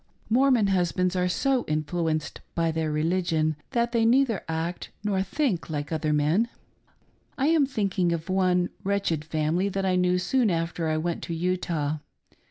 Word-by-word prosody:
Mormon 255 -2 +4
husbands 185 -1 +1
are 180 0 +1
so 265 +6 +1
influenced 155 +1 -2
by 165 -1 +1
their 160 -1 -1
religion 160 0 +1
that 235 -2 0
they 230 -1 +2
neither 235 -2 +3
act 165 +2 -3
nor 200 -2 +1
think 195 - -1
like 145 -1 -4
other 155 -1 0
men. 155 +10 +2 0.9
I 275 +3 +2
am 315 -4 +4
thinking 195 -8 0
of 165 -1 -3
one 185 -1 +2
wretched 195 -6 0
family 160 +5 0
that 195 0 -2
I 185 -1 +2
knew 180 0 +2
soon 220 +6 +2
after 165 -1 -1
I 155 0 +1
went 170 +2 -2
to 170 - -4
Utah. 165 -4 -1
180 Hz, 160 wpm, -26 LUFS, 160-200 Hz, 0.9 s, Mormon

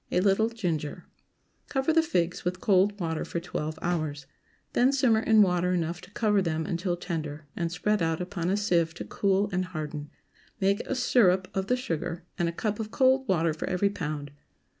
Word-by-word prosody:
A - - +3
little 200 +4 +3
ginger. 170 -10 -3 0.6
Cover 270 +3 +1
the 325 - +5
figs 180 - -1
with 180 +1 -2
cold 200 +1 +3
water 160 -3 -2
for 170 - -3
twelve 155 -2 -4
hours. 155 -5 -2 0.5
Then 250 +2 +4
simmer 255 -5 +3
in 220 -1 +5
water 180 -1 +1
enough 170 0 -1
to - - -13
cover 210 -1 +2
them 160 -3 -1
until 175 -1 -1
tender, 155 -4 -4
and 170 -1 -2
spread 205 +4 0
out 165 -1 0
upon 180 -1 -3
a 195 - +2
sieve 170 -5 +1
to - - -6
cool 200 0 +1
and 185 +1 +1
harden. 150 -4 -5 0.5
Make 200 +1 +2
a 270 - -1
syrup 190 -7 +3
of 190 0 -1
the 250 - +2
sugar, 170 -6 -4
and 170 -1 +2
a - - -2
cup 210 +5 -2
of 215 -1 -3
cold 260 +2 +3
water 165 -3 +2
for 155 - -4
every 190 +2 +1
pound. 150 -6 -4
180 Hz, 190 wpm, -28 LUFS, 165-210 Hz, 0.6 s, the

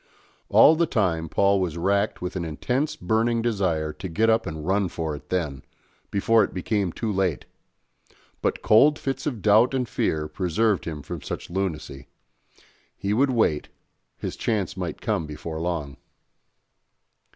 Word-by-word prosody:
All 160 - +7
the 170 +1 +2
time 85 - 0
Paul 100 +2 +3
was 85 -3 -2
racked 100 +3 0
with 90 - -4
an 90 - -2
intense 125 - -1
burning 115 +5 +1
desire 90 -9 0
to 95 - -7
get 110 +7 +2
up 110 -3 +1
and 80 -2 -5
run 95 +1 +1
for 80 -3 -3
it 75 +1 -13
then, 80 -7 -2 0.5
before 115 +3 +3
it - - -4
became 95 0 -1
too 110 +4 -3
late; 95 -6 0 1.0
but - - -1
cold 145 +8 +5
fits 135 +1 -3
of 120 -9 -4
doubt 110 +5 +5
and 125 -2 0
fear 75 -7 -1
preserved 95 +5 0
him 75 -3 -5
from 85 +1 -6
such 70 - -6
lunacy 75 -7 -4 0.9
he 100 +1 -1
would 135 +5 +3
wait, 110 - +1 0.5
his - - -5
chance 105 -4 -1
might 90 -4 -5
come 80 - -1
before 80 +2 -6
long. 80 -5 -3
95 Hz, 155 wpm, -25 LUFS, 80-110 Hz, 1.0 s, All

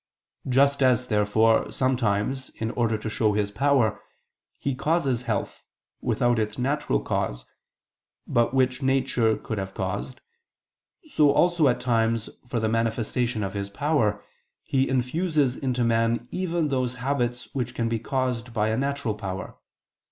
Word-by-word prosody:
Just 140 +2 +3
as, 125 -1 +3
therefore, 110 +1 +3
sometimes, 130 0 0
in 110 0 -3
order 115 -3 0
to 105 - -6
show 110 0 +1
His 100 -1 0
power, 130 -2 +2 0.6
He 140 - -2
causes 140 -3 0
health, 105 -3 -2 0.4
without 120 -1 +1
its 110 -1 -2
natural 145 +4 0
cause, - - -2 0.8
but 120 0 +2
which 130 0 +1
nature 130 -4 +2
could 110 -3 -4
have 95 0 -5
caused, 100 +7 -4 0.9
so 150 - +4
also, 170 +1 +3
at 125 - +2
times, 115 -2 0 0.2
for 120 -1 -1
the 110 - 0
manifestation 115 +1 0
of 95 - -3
His 100 -1 -4
power, 115 -3 0 0.4
He 135 0 +1
infuses 135 +1 +1
into 125 -2 -1
man 115 0 +1
even 175 -4 -1
those 130 -2 -1
habits 125 -2 -2
which 125 -3 -3
can 115 - 0
be 115 0 -1
caused 125 -1 -2
by 110 0 +2
a 110 - 0
natural 140 -4 -1
power. 95 -3 -6
120 Hz, 145 wpm, -25 LUFS, 110-135 Hz, 0.9 s, so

